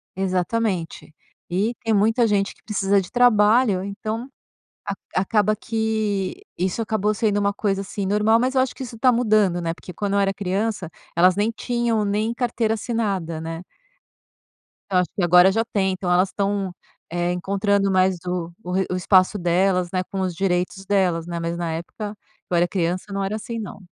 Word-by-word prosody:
Exatamente. 185 -3 -2 0.4
E 205 +7 0
tem 225 -1 +1
muita 225 +3 +3
gente 200 -1 +1
que - - -30
precisa 200 -2 +1
de 180 - -10
trabalho, 220 -4 +4
então, 215 +5 -4 0.9
ac 185 - +2
acaba 210 +1 +2
que 220 - -2 0.2
isso 185 +5 -1
acabou 215 -1 0
sendo 205 -1 +1
uma 200 0 +1
coisa, 200 -1 -1
assim, 200 0 -4
normal, 210 +3 +3
mas 260 +2 0
eu 260 - +4
acho 260 - 0
que - - -8
isso 230 -3 -8
tá 255 +1 +4
mudando, 215 -7 +2
né, 165 -1 -1
porque 180 - -11
quando 200 +3 -2
eu - - +3
era 195 0 +2
criança 200 -1 -2 0.3
elas 180 +2 +5
nem 215 +3 +1
tinham 235 -3 0
nem 215 +3 0
carteira 235 -2 0
assinada, 200 -8 -2
né. 165 +2 -6 1.3
Então 185 - +3
acho 175 - -3
que 190 - 0
agora 180 +2 +6
já 225 +3 +1
tem, 190 -2 +1
então 185 -1 -2
elas 185 +2 +3
estão, 200 -2 -1 0.4
eh, 175 0 0
encontrando 195 +2 +1
mais 185 -1 +3
o 180 +1 -4
re 190 0 +1
o - - 0
espaço 185 +2 +3
delas, 180 0 +1
né, 185 - +1
com 195 - -3
os 185 -2 -1
direitos 185 +1 -1
delas, 180 -4 +1
né, 170 -1 -4
mas 170 0 -2
na 170 -2 -2
época 205 +6 -6
que 205 - -39
eu - - +4
era 175 +1 +3
criança 185 +2 -2
não 195 0 -1
era 200 +2 -2
assim 230 +1 -5
não. 210 -1 -7
195 Hz, 185 wpm, -22 LUFS, 180-215 Hz, 1.3 s, agora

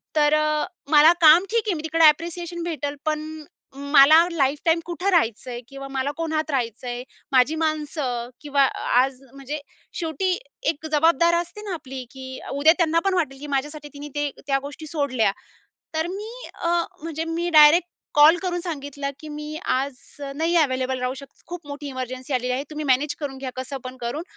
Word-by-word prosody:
तर 295 -1 +4
अ, 305 0 +2 0.3
मला 310 +2 +8
काम 325 +4 +8
ठीक 460 -1 +2
आहे 405 - +2
मी 305 - -6
तिकडे 320 +1 +3
ॲप्रिसिएशन 340 +2 +1
भेटेल, 295 -4 -3
पण 310 0 -3 0.3
मला 280 +2 +6
लाईफटाईम 300 +2 +1
कुठं 350 +3 -2
राहायचं 250 - +1
आहे? 240 0 -5
किंवा 275 +1 -8
मला 270 +1 -1
कोणात 315 -1 -2
राहायचं 245 -2 -2
आहे? 245 0 -4 0.3
माझी 265 +4 +4
माणसं 300 -6 -2
किंवा 285 -2 +2
अ, - - -3 0.2
आज 265 0 -2
म्हणजे 275 +2 -6 0.4
शेवटी 330 +3 -1 0.4
एक 315 0 -13
जबाबदार 335 +3 +4
असते 350 +5 -10
ना 400 -3 -5
आपली, 270 -5 -7
की 260 -1 -8
अ, - - -10
उद्या 285 +4 +5
त्यांना 335 -2 +2
पण 390 - +2
वाटेल 300 -7 -1
की 295 - -8
माझ्यासाठी 295 +2 -4
तिने 290 +1 -8
ते 290 0 0 0.2
त्या 275 -1 +2
गोष्टी 290 +2 -8
सोडल्या. 280 -9 +1 0.6
तर 315 +1 0
मी 420 +4 -6 0.2
अ, 340 - -3 0.3
म्हणजे 325 0 -4
मी 345 +1 -1
डायरेक्ट 315 +2 +7 0.3
कॉल 300 +3 +7
करून 355 -2 -1
सांगितलं 285 -4 -5
की 310 - -9
मी 300 +1 -6
आज 270 +1 0 0.3
अ, 275 - -5
नाही 330 +2 +1
अव्हेलेबल 260 -4 +1
राहू 250 +1 -1
शकत, 275 - -16
खूप 345 -3 -8
मोठी 285 0 -6
इमर्जन्सी 255 0 -5
आलेली 250 0 0
आहे, 260 +2 -1
तुम्ही 305 0 -5
मॅनेज 275 +3 +2
करून 275 -3 -5
घ्या 265 -1 -5
कसं 260 +2 -5
पण 255 0 -7
करून. 240 +7 -3
295 Hz, 185 wpm, -23 LUFS, 270-325 Hz, 0.6 s, मला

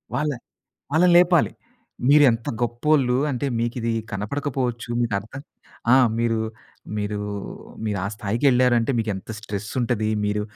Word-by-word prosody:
వాళ్ళ 150 +3 0 0.6
వాళ్ళని 175 +3 +4
లేపాలి. 175 -2 +4 0.6
మీరు 145 +1 +7
ఎంత 115 0 -3
గొప్పోళ్ళు. 125 +2 +2
అంటే 140 +1 -2
మీకిది 115 0 -1 0.2
కనపడకపోవచ్చు. 120 +2 -3
మీకర్థం 110 +4 -3 0.5
ఆ! - - +8 0.2
మీరు 115 -1 +1 0.6
మీరు, 105 0 -2 0.7
మీరు 105 -2 -1
ఆ - - -1
స్థాయికి 105 +4 -3
వెళ్లారంటే 125 -2 +3
మీకు 110 -1 -1
ఎంత 95 +3 -8
స్ట్రెసుంటది 110 +2 -2 0.2
మీరు 105 0 0
120 Hz, 120 wpm, -23 LUFS, 110-135 Hz, 0.7 s, ఆ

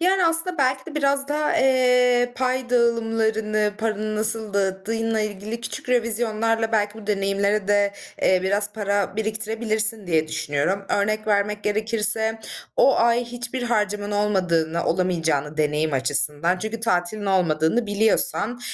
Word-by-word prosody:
Yani, 370 +1 +3
aslında 330 +1 -1
belki 260 +1 +1
de 320 - -9
biraz 280 -1 +1
daha, 300 +1 0
eee, 250 -2 +3
pay 255 -1 -1
dağılımlarını, 225 -3 +1
paranı 215 -1 -2
nasıl 220 -1 -2
dağıttığınla 215 +3 -1
ilgili 215 +2 -4
küçük 235 - -7
revizyonlarla 225 -1 0
belki 210 -1 +1
bu 210 - -12
deneyimlere 200 0 0
de, 205 -1 +2 0.3
eee, 185 -1 +3
biraz 205 +2 0
para 205 -1 -1
biriktirebilirsin 220 -1 -1
diye 160 -2 +1
düşünüyorum. 155 +5 -1
Örnek 215 +2 0
vermek 205 0 0
gerekirse 220 +1 0 0.4
o - - +5
ay 235 +1 +2
hiçbir 245 +1 -6
harcaman 210 -3 -1
olmadığını, 180 -6 0
olamayacağını 165 -5 0
deneyim 150 0 0
açısından, 150 +6 +1
çünkü 220 +2 -5
tatilin 205 -1 -1
olmadığını 180 +3 +1
biliyorsan, 220 +2 +1
215 Hz, 130 wpm, -23 LUFS, 195-235 Hz, 0.4 s, o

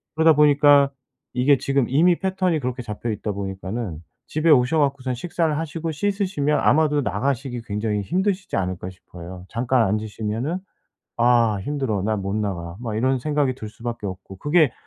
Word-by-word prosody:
그러다 160 0 +6
보니까 145 -1 +5 0.4
이게 130 +3 +4
지금 135 -1 +1
이미 170 +6 +4
패턴이 185 -4 0
그렇게 125 -1 -3
잡혀 115 +1 -5
있다 105 0 -3
보니까는 95 -2 -5 0.2
집에 155 +2 0
오셔 140 +2 +5
갖고선 135 -3 0
식사를 160 +2 -1
하시고 165 +1 -3
씻으시면 185 -5 0
아마도 150 -1 +3
나가시기 130 -2 -2
굉장히 105 0 -1
힘드시지 190 - -1
않을까 90 -1 -3
싶어요. 90 0 -11
잠깐 120 +1 +2
앉으시면은 110 - -2 0.6
'아 115 -3 +3
힘들어. 130 -6 -2
나 110 +2 0
못 100 0 -3
나가.' 85 -5 -3
막 115 -3 -4
이런 130 +3 +2
생각이 145 -2 0
들 110 -4 -7
수밖에 115 -1 -6
없고. 95 0 -8
그게 150 - +3
125 Hz, 370 characters per minute, -23 LUFS, 105-150 Hz, 0.6 s, 그러다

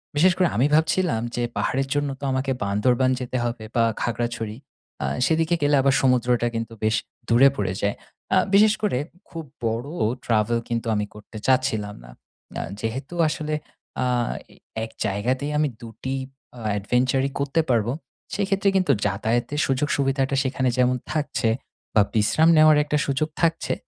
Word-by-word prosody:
বিশেষ 180 +5 +5
করে 185 - +4
আমি 125 +6 +3
ভাবছিলাম 160 -5 +2
যে 120 - -1
পাহাড়ের 135 +1 0
জন্য 145 0 0
তো - - -13
আমাকে 130 +1 -1
বান্দরবান 120 +6 +2
যেতে 130 0 -3
হবে 115 -2 -3
বা 115 - +4 0.2
খাগড়াছড়ি, 115 -2 -2 0.5
আ - - 0 0.2
সেদিকে 160 +4 +2
গেলে 145 0 +3
আবার 135 0 +3
সমুদ্রটা 125 -2 +2
কিন্তু 115 0 -3
বেশ 110 +1 +2 0.3
দূরে 125 +4 +7
পড়ে 95 -5 -1
যায়। 100 0 0 0.4
আ - - +5 0.2
বিশেষ 210 +2 +6
করে 210 -11 +1 0.3
খুব 165 -1 -6 0.2
বড় 115 +4 -1 0.4
travel 115 +1 +2
কিন্তু 115 -1 -2
আমি 105 0 0
করতে 105 +1 -11
চাচ্ছিলাম 125 -6 +1
না। - - -13 0.5
আ - - -1 0.2
যেহেতু 125 +8 -4
আসলে 155 0 -3 0.5
আ - - +1 0.5
এই - - -21 0.3
এক 110 - -6
জায়গাতেই 125 +8 -1
আমি 150 0 +3
২টি 115 +3 -5 0.4
আ - - -9 0.2
adventure 125 +6 +1
ই - - -4
করতে 140 +3 +1
পারব, 115 -3 +2 0.5
সেই 200 - 0
ক্ষেত্রে 195 0 +2
কিন্তু 185 -6 +2
যাতায়াতের 115 +8 0
সুযোগ 135 +2 +1
সুবিধাটা 135 -1 +1
সেখানে 130 -1 0
যেমন 125 0 +3 0.2
থাকছে, 150 -6 0 0.5
বা 105 - +7
বিশ্রাম 155 +10 +4
নেওয়ার 155 -1 +7
একটা 150 0 0
সুযোগ 145 +3 0
থাকছে, 165 -1 +1
130 Hz, 160 wpm, -24 LUFS, 115-145 Hz, 0.5 s, দূরে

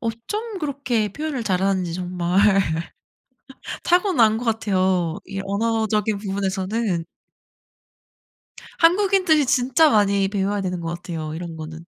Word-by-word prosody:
어쩜 370 - -4
그렇게 260 - -1
표현을 300 -4 -4
잘하는지 190 -2 0
정말 180 0 -1 1.4
타고난 345 - +3
것 235 - -5
같아요, 185 -6 0
이 195 0 -6
언어적인 215 +1 0
부분에서는. 195 -1 -2 1.7
한국인들이 360 -3 +4
진짜 260 +5 +3
많이 200 -2 +3
배워야 200 0 -1
되는 180 -2 -3
것 165 0 -4
같아요, 165 -3 -6
이런 165 0 -6
거는. 160 +1 -8
205 Hz, 265 characters per minute, -22 LUFS, 185-250 Hz, 1.7 s, 한국인들이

